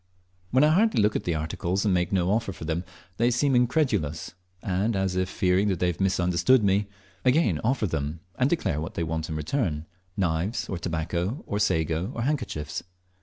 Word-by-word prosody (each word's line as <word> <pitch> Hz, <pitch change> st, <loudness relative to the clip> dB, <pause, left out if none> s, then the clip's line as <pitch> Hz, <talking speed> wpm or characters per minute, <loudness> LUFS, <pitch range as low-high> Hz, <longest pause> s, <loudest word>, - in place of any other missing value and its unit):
When 130 Hz, +3 st, +4 dB
I 150 Hz, -, +6 dB
hardly 210 Hz, +7 st, +3 dB
look 105 Hz, 0 st, +3 dB
at -, -, -2 dB
the 85 Hz, -, 0 dB
articles, 85 Hz, +5 st, -2 dB
and 100 Hz, -, +3 dB
make 90 Hz, -1 st, +1 dB
no 95 Hz, -1 st, +2 dB
offer 110 Hz, -1 st, 0 dB
for 85 Hz, -, -8 dB
them, 80 Hz, +3 st, -1 dB, 0.3 s
they 120 Hz, +1 st, +3 dB
seem 130 Hz, +2 st, +2 dB
incredulous, 120 Hz, -, +1 dB, 0.3 s
and, 100 Hz, +4 st, 0 dB
as 95 Hz, -1 st, 0 dB
if 95 Hz, 0 st, 0 dB
fearing 95 Hz, +3 st, +2 dB
they 90 Hz, -3 st, +1 dB
have 90 Hz, +1 st, -1 dB
misunderstood 95 Hz, +5 st, +3 dB
me, 100 Hz, +1 st, +2 dB, 0.4 s
again 125 Hz, -, +3 dB
offer 120 Hz, -1 st, +1 dB
them, 80 Hz, -2 st, -2 dB
and 130 Hz, +6 st, +1 dB
declare 85 Hz, -, 0 dB
what 80 Hz, -, -6 dB
they 85 Hz, -, -1 dB
want 80 Hz, 0 st, -3 dB
in 80 Hz, -, -3 dB
return 75 Hz, -, -1 dB, 0.3 s
knives, 90 Hz, +3 st, 0 dB
or 95 Hz, -, -4 dB
tobacco, 85 Hz, -, -2 dB
or 105 Hz, -, -2 dB
sago, 80 Hz, 0 st, 0 dB
or 120 Hz, -, -2 dB
handkerchiefs. 120 Hz, -, -2 dB
95 Hz, 185 wpm, -26 LUFS, 80-115 Hz, 0.4 s, I